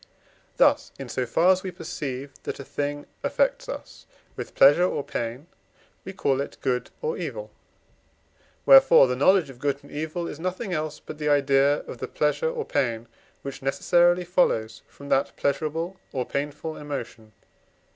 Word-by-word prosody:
Thus, -, -, +3 dB
in 135 Hz, -2 st, -8 dB
so 125 Hz, +1 st, -2 dB
far 165 Hz, +10 st, +4 dB
as 185 Hz, 0 st, +2 dB
we 190 Hz, -, -4 dB
perceive 145 Hz, -6 st, -6 dB
that -, -, -5 dB
a -, -, -6 dB
thing 145 Hz, +1 st, -3 dB, 0.2 s
affects -, -, 0 dB
us -, -, -8 dB, 0.3 s
with -, -, -7 dB
pleasure 145 Hz, +6 st, +7 dB
or 145 Hz, -, -2 dB
pain, 120 Hz, +4 st, -4 dB, 0.6 s
we 190 Hz, -, -5 dB
call 140 Hz, -7 st, 0 dB
it -, -, -6 dB
good 125 Hz, -2 st, -1 dB
or 470 Hz, 0 st, -1 dB
evil; -, -, -5 dB, 1.1 s
wherefore 270 Hz, -, +8 dB
the 125 Hz, -1 st, -1 dB
knowledge 160 Hz, +2 st, +3 dB
of 125 Hz, -, -16 dB
good 140 Hz, 0 st, 0 dB
and 145 Hz, -, -15 dB
evil 160 Hz, +3 st, -4 dB
is 150 Hz, -, -7 dB
nothing 185 Hz, +3 st, -3 dB
else 155 Hz, -1 st, -3 dB
but 155 Hz, -, -10 dB
the 150 Hz, 0 st, 0 dB
idea 140 Hz, 0 st, +3 dB
of -, -, -10 dB
the -, -, -4 dB
pleasure 480 Hz, -, 0 dB
or 480 Hz, -2 st, -4 dB
pain, 120 Hz, -5 st, -1 dB, 0.4 s
which 140 Hz, 0 st, -7 dB
necessarily 175 Hz, +6 st, +3 dB
follows 115 Hz, -11 st, +1 dB
from 140 Hz, 0 st, -12 dB
that 135 Hz, -, +1 dB
pleasurable 160 Hz, +5 st, -2 dB
or 130 Hz, -2 st, -2 dB
painful 150 Hz, +3 st, -4 dB
emotion 135 Hz, -6 st, -6 dB
(II. -, -, -36 dB
145 Hz, 165 wpm, -25 LUFS, 135-175 Hz, 1.1 s, wherefore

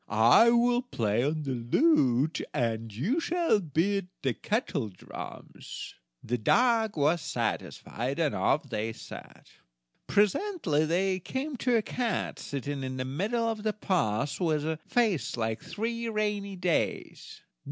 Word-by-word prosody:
I 115 Hz, -, +6 dB
will 240 Hz, +1 st, +3 dB
play 115 Hz, -, 0 dB
on 155 Hz, +2 st, -1 dB
the 140 Hz, -, -3 dB
lute, 130 Hz, -, +2 dB
and 115 Hz, -2 st, -1 dB
you 175 Hz, -, 0 dB
shall 335 Hz, -8 st, +2 dB
beat 180 Hz, +3 st, 0 dB, 0.2 s
the 130 Hz, -3 st, +1 dB
kettledrums." 145 Hz, -, -5 dB, 0.3 s
The 125 Hz, +1 st, -2 dB
dog 225 Hz, -, +3 dB
was 150 Hz, +3 st, +2 dB
satisfied, 130 Hz, 0 st, -3 dB
and 160 Hz, -4 st, +1 dB
off 150 Hz, -, +2 dB
they 110 Hz, -2 st, -3 dB
set. -, -, -11 dB, 0.6 s
Presently 205 Hz, -, +2 dB
they 185 Hz, +3 st, +1 dB
came 265 Hz, -, -4 dB
to 240 Hz, 0 st, +2 dB
a 220 Hz, -, 0 dB
cat, 240 Hz, 0 st, -2 dB
sitting 140 Hz, 0 st, -4 dB
in 130 Hz, 0 st, -4 dB
the 130 Hz, -, -2 dB
middle 210 Hz, -, -1 dB
of 225 Hz, -2 st, -2 dB
the 215 Hz, 0 st, 0 dB
path, 140 Hz, -, 0 dB
with 155 Hz, -4 st, +1 dB
a 160 Hz, 0 st, -2 dB
face 190 Hz, -, +1 dB
like 110 Hz, -1 st, -2 dB
three 230 Hz, +2 st, -3 dB
rainy 210 Hz, -2 st, -1 dB
days! 180 Hz, -2 st, -2 dB
170 Hz, 135 wpm, -29 LUFS, -, 0.6 s, I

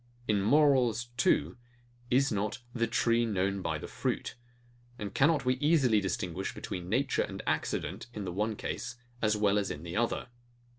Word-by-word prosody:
In 105 Hz, -2 st, +2 dB
morals 125 Hz, -2 st, +3 dB
too, 85 Hz, -, +2 dB, 0.5 s
is 135 Hz, +2 st, +3 dB
not 105 Hz, +2 st, -1 dB, 0.2 s
THE 115 Hz, -1 st, +1 dB
TREE 115 Hz, 0 st, +2 dB
KNOWN 100 Hz, -1 st, 0 dB
BY -, -, -1 dB
THE -, -, -7 dB
FRUIT? -, -, -2 dB, 0.6 s
And 105 Hz, -2 st, -5 dB
cannot 145 Hz, 0 st, +3 dB
we 125 Hz, 0 st, +2 dB
easily 135 Hz, -7 st, +3 dB
distinguish 95 Hz, -2 st, -3 dB
between 90 Hz, -1 st, -5 dB
nature 130 Hz, +6 st, +1 dB
and -, -, -4 dB
accident, -, -, -2 dB
in 105 Hz, -4 st, -5 dB
the 90 Hz, -, -4 dB
one 105 Hz, +3 st, -1 dB
case 120 Hz, +3 st, -4 dB, 0.3 s
as 110 Hz, -1 st, +2 dB
well 105 Hz, -1 st, +3 dB
as 100 Hz, -, -2 dB
in 75 Hz, -, -6 dB
the 85 Hz, 0 st, -6 dB
other? 120 Hz, +2 st, 0 dB
110 Hz, 165 wpm, -31 LUFS, 100-125 Hz, 0.6 s, morals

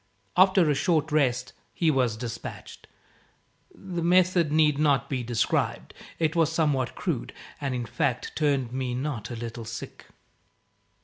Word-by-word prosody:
After 185 Hz, -2 st, +5 dB
a 150 Hz, -, +3 dB
short 155 Hz, +1 st, +1 dB
rest, 125 Hz, -5 st, +1 dB, 0.2 s
he 165 Hz, -3 st, +3 dB
was 125 Hz, -6 st, +1 dB
despatched. 115 Hz, 0 st, -7 dB, 0.8 s
The 180 Hz, -3 st, -6 dB
method 175 Hz, -2 st, +3 dB
need 150 Hz, -2 st, +3 dB
not 140 Hz, -3 st, +2 dB
be 130 Hz, -2 st, -1 dB
described. 115 Hz, -1 st, -1 dB, 0.2 s
It 160 Hz, -1 st, 0 dB
was 165 Hz, -2 st, +3 dB
somewhat 150 Hz, -6 st, 0 dB
crude, -, -, -3 dB, 0.3 s
and 135 Hz, -3 st, -1 dB
in 120 Hz, -1 st, -3 dB
fact 135 Hz, -2 st, -1 dB
turned 140 Hz, -5 st, 0 dB
me 130 Hz, -2 st, -2 dB
not 130 Hz, -5 st, -3 dB
a 120 Hz, -, -5 dB
little 115 Hz, 0 st, -6 dB
sick. 115 Hz, +1 st, -8 dB
140 Hz, 140 wpm, -26 LUFS, 125-160 Hz, 0.8 s, After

